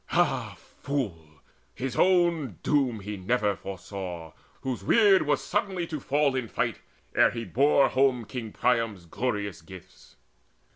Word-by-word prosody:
Ah - - +1 0.3
fool! 85 - -4 0.3
his 130 0 -4
own 170 - +2
doom 130 -7 +1 0.3
never 115 -4 +2
he - - -4
foresaw, 90 -4 -7 0.3
Whose 125 -6 -4
weird 205 - +5
was 145 -2 +1
suddenly 190 -3 -1
to 155 -3 -5
fall 140 0 +1
in 130 -3 -2
fight - - -2 0.3
Ere - - +5
he 115 -1 -5
bore 140 +3 +4
home 130 -3 +2
King 115 -2 -6
Priam's 115 -8 0
glorious 100 -1 -3
gifts. 90 +1 -14
125 Hz, 135 wpm, -27 LUFS, 100-145 Hz, 0.3 s, weird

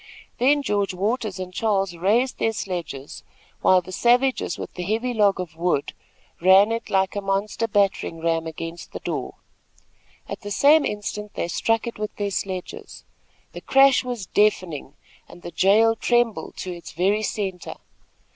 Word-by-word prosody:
Then 285 +3 +3
George 200 -5 -1
Waters 210 +1 -2
and 185 -1 -6
Charles 195 -4 0
raised 220 +9 +1
their 225 - +1
sledges, 170 -9 -5 0.4
while 185 -1 +5
the 185 - -10
savages 245 -1 +2
with - - -7
the - - -6
heavy 225 +7 -1
log 205 -4 +3
of 175 -3 -6
wood 165 -4 -1 0.5
ran 190 +4 +6
it 230 0 -3
like 190 0 +1
a 205 - -2
monster 200 +3 -1
battering 200 -5 0
ram 165 0 0
against 165 +1 -7
the - - -5
door. - - -4 0.9
At - - -6
the 205 - -7
same 290 +8 +5
instant 210 0 -5
they - - -2
struck 225 +6 0
it 235 -2 -6
with 215 0 -4
their 205 -1 -2
sledges. 185 -1 -5 0.5
The - - -9
crash 270 -1 +5
was 245 -5 -5
deafening, 175 -9 0 0.3
and 175 - -14
the 175 - -7
jail 220 +5 +4
trembled 240 -1 0
to 185 - -5
its 170 -1 -10
very 195 +6 +1
centre. 195 -5 -4
200 Hz, 160 wpm, -23 LUFS, 180-225 Hz, 0.9 s, ran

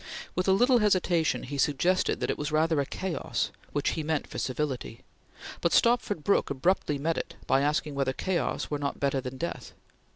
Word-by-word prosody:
With 185 - -1
a - - +5
little 245 +6 +5
hesitation, 185 -6 +2
he 140 +2 -5
suggested 175 +7 +2
that - - +1
it - - -4
was 150 +1 -2
rather 155 -1 +2
a 140 - -3
chaos, 190 -3 -2 0.2
which 145 - 0
he 160 - -2
meant 155 -1 -1
for - - -7
civility; 130 -4 -3 0.6
but 170 - +1
Stopford 235 -8 +3
Brooke 200 - +2
abruptly 150 +1 +1
met 160 +4 0
it - - -6
by 135 - +3
asking 150 +1 0
whether 135 -1 0
chaos 175 +4 -2
were 145 - -1
not 140 -1 -3
better 140 -1 +1
than 130 0 -6
death. 170 +5 -5
155 Hz, 190 wpm, -28 LUFS, 140-185 Hz, 0.6 s, a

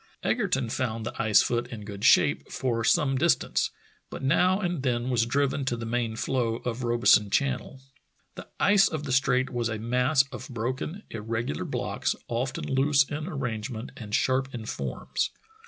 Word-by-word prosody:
Egerton 180 - 0
found 115 -2 -2
the - - -4
ice 110 -2 +5
foot 120 0 -1
in 115 -4 -8
good 100 -1 -8
shape - - +4
for 115 -3 -1
some 135 0 +2
dis 170 +3 +5
tance, - - -1 0.4
but - - -7
now 180 +8 +3
and 175 -6 -2
then 125 -1 -1
was 115 -2 +2
driven 140 +2 0
to 120 -2 -1
the 115 - -5
main 115 -1 -1
floe 115 -1 0
of 125 0 -2
Robeson 120 -3 +4
Channel. 130 +2 -1 0.5
The - - -10
ice 200 -1 +5
of 155 -2 -4
the 140 - -4
strait 130 0 +2
was 120 -2 -1
a 110 - -3
mass 125 +5 +2
of 130 - -8
broken, 130 - -4
irregular 115 -6 -3
blocks, - - -2
often 120 +3 -2
loose 140 +1 +3
in 145 +3 -5
arrangement 120 -7 -4
and 105 -2 -4
sharp 130 0 +1
in 115 -2 -6
forms. - - -3
125 Hz, 170 wpm, -27 LUFS, 115-135 Hz, 0.5 s, ice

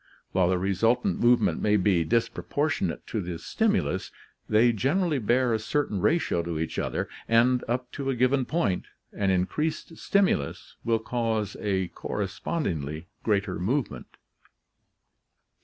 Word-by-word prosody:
While 90 -1 +2
the 95 - +2
resultant 100 +7 +1
movement 120 0 +3
may 105 0 +3
be 95 -3 +3
dis 115 +6 +2
proportionate 145 - -2
to 110 - -3
the 90 -2 -4
stimulus, 205 - 0 0.4
they 115 +3 +5
generally 150 - +1
bear 120 +2 +2
a 110 - +1
certain 110 -4 -1
ratio 155 - +2
to 85 -1 -4
each 80 0 -2
other, - - -2 0.2
and, 120 +2 +4
up 125 +1 -2
to 135 -1 -4
a 135 - 0
given 130 +2 +2
point, 120 - 0 0.3
an 100 -1 0
increased 150 - -1
stimulus 190 - 0
will 115 -1 +2
cause 110 -2 -2
a 95 -3 -1
correspondingly 90 - -3
greater 100 -4 0
movement. 120 +9 -2
110 Hz, 135 wpm, -27 LUFS, 95-130 Hz, 0.4 s, they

